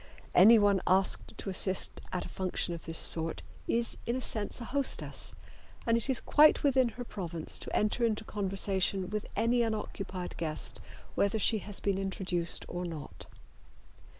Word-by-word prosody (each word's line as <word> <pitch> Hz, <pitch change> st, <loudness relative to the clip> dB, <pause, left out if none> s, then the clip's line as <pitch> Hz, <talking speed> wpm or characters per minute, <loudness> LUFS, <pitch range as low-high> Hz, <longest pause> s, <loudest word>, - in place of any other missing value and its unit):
Anyone 205 Hz, -1 st, +6 dB
asked 190 Hz, +1 st, +3 dB
to 195 Hz, -, -4 dB
assist 190 Hz, 0 st, +1 dB
at 180 Hz, -, -3 dB
a -, -, -7 dB
function 185 Hz, -2 st, -2 dB
of 170 Hz, -, -8 dB
this 165 Hz, 0 st, -3 dB
sort 165 Hz, 0 st, +2 dB, 0.2 s
is 235 Hz, 0 st, -1 dB
in 235 Hz, -, 0 dB
a -, -, -2 dB
sense 215 Hz, -3 st, -1 dB
a 235 Hz, -, -6 dB
hostess, 275 Hz, +2 st, 0 dB, 0.5 s
and 230 Hz, -, +3 dB
it 230 Hz, +3 st, 0 dB
is 260 Hz, -, +2 dB
quite 300 Hz, +1 st, +5 dB
within 260 Hz, -3 st, +3 dB
her 245 Hz, -, -4 dB
province 170 Hz, -8 st, -3 dB
to -, -, -6 dB
enter 215 Hz, +3 st, 0 dB
into 220 Hz, -2 st, 0 dB
conversation 195 Hz, -2 st, 0 dB
with 210 Hz, -1 st, -3 dB
any 235 Hz, +3 st, +2 dB
unoccupied 200 Hz, -5 st, -4 dB
guest 155 Hz, -2 st, -3 dB, 0.3 s
whether 200 Hz, +2 st, +1 dB
she 220 Hz, +1 st, +2 dB
has 205 Hz, 0 st, -8 dB
been 195 Hz, -1 st, -1 dB
introduced 185 Hz, -3 st, -1 dB
or 175 Hz, +1 st, -5 dB
not. 160 Hz, -5 st, -8 dB
200 Hz, 160 wpm, -30 LUFS, 185-230 Hz, 0.5 s, Anyone